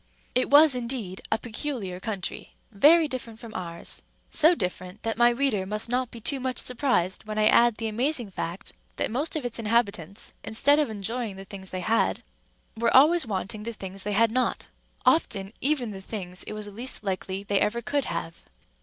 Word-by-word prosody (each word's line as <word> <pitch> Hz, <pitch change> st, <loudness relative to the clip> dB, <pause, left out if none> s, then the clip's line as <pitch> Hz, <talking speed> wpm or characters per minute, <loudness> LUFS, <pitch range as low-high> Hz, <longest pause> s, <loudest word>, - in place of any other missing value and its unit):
It 255 Hz, -, +2 dB
was, 295 Hz, 0 st, +7 dB
indeed, 235 Hz, -6 st, -4 dB
a 220 Hz, -, +3 dB
peculiar 220 Hz, -5 st, -4 dB
country, 195 Hz, -2 st, -5 dB, 0.2 s
very 310 Hz, +10 st, +6 dB
different 245 Hz, -5 st, -6 dB
from 230 Hz, -2 st, -10 dB
ours—so 185 Hz, -, 0 dB
different, 185 Hz, -, -5 dB
that 225 Hz, 0 st, -1 dB
my 240 Hz, +1 st, +5 dB
reader 240 Hz, -5 st, +1 dB
must 210 Hz, +3 st, -2 dB
not 250 Hz, 0 st, 0 dB
be 235 Hz, -, -10 dB
too 270 Hz, +5 st, -1 dB
much 255 Hz, 0 st, -2 dB
surprised 235 Hz, -9 st, 0 dB
when 215 Hz, 0 st, -5 dB
I 215 Hz, -, +3 dB
add 235 Hz, +1 st, +5 dB
the 225 Hz, 0 st, -3 dB
amazing 240 Hz, 0 st, 0 dB
fact, 175 Hz, 0 st, -5 dB, 0.2 s
that -, -, -1 dB
most 285 Hz, +8 st, -1 dB
of 300 Hz, -5 st, -2 dB
its 240 Hz, -1 st, -2 dB
inhabitants, 210 Hz, -4 st, 0 dB
instead 285 Hz, +7 st, +3 dB
of 295 Hz, -, +1 dB
enjoying 220 Hz, +1 st, -4 dB
the 195 Hz, 0 st, -9 dB
things 190 Hz, -1 st, -7 dB
they 185 Hz, -, -4 dB
had, 215 Hz, -, +1 dB, 0.5 s
were 230 Hz, +2 st, +4 dB
always 310 Hz, +1 st, +5 dB
wanting 210 Hz, +1 st, -3 dB
the 230 Hz, +2 st, -5 dB
things 195 Hz, -2 st, -7 dB
they 210 Hz, +1 st, -2 dB
had 225 Hz, +2 st, +4 dB
not, 255 Hz, +2 st, 0 dB, 0.4 s
often 200 Hz, -11 st, +2 dB
even 265 Hz, -4 st, +1 dB
the 195 Hz, -1 st, -8 dB
things 185 Hz, -3 st, -6 dB
it -, -, -5 dB
was 210 Hz, -1 st, -5 dB
least 225 Hz, +4 st, -1 dB
likely 190 Hz, 0 st, -3 dB
they 200 Hz, -1 st, +1 dB
ever 235 Hz, +3 st, 0 dB
could 280 Hz, +5 st, 0 dB
have. 170 Hz, 0 st, -4 dB
225 Hz, 185 wpm, -26 LUFS, 195-250 Hz, 0.5 s, was